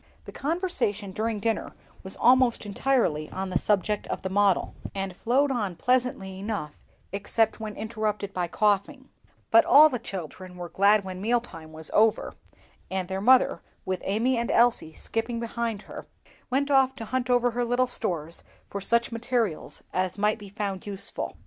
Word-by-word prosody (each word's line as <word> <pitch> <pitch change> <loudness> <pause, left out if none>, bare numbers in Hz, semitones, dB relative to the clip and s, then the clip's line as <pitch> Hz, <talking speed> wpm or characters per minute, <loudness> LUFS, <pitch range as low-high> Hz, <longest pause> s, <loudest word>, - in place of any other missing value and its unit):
The - - -9
conversation 275 - -1
during 215 +2 -2
dinner 225 +2 -2 0.3
was 190 - -3
almost 250 -2 +4
entirely 205 - 0
on 190 0 -4
the 180 - +1
subject 210 0 0
of - - -4
the 190 - -3
model, 200 -1 +2 0.2
and 195 -2 -3
flowed 270 +8 +2
on 205 -8 -2
pleasantly 245 -5 0
enough, 195 -8 -4 0.4
except 215 +3 0
when 215 -2 -6
interrupted 215 -2 -3
by 180 -1 -1
coughing; 210 - 0 0.4
but 225 - +7
all 300 +3 +8
the 250 -4 -3
children 185 -2 -7
were 175 -1 -6
glad 200 +1 +4
when 185 -1 -6
meal 240 +4 +2
time 165 -9 -11
was 160 0 -5
over, 220 0 +3 0.6
and 185 -1 -3
their 190 0 -2
mother, 255 +4 +4 0.2
with 185 -1 -2
Amy 230 +5 +1
and 235 - -2
Elsie 235 -9 +3
skipping 230 +8 -3
before 235 -1 -2
her, - - -9 0.4
went 280 +2 0
off 265 -1 +4
to 225 - -7
hunt 255 +2 -2
over 245 0 +3
her 245 +1 -1
little 245 +2 +2
stores 170 -10 -3 0.3
for 200 - -4
such 235 +4 +1
materials 230 -6 -1
as 185 +2 -1
might 210 +1 +1
be 205 -1 -10
found 200 -1 -4
useful. 200 -1 -3
215 Hz, 170 wpm, -26 LUFS, 190-245 Hz, 0.6 s, all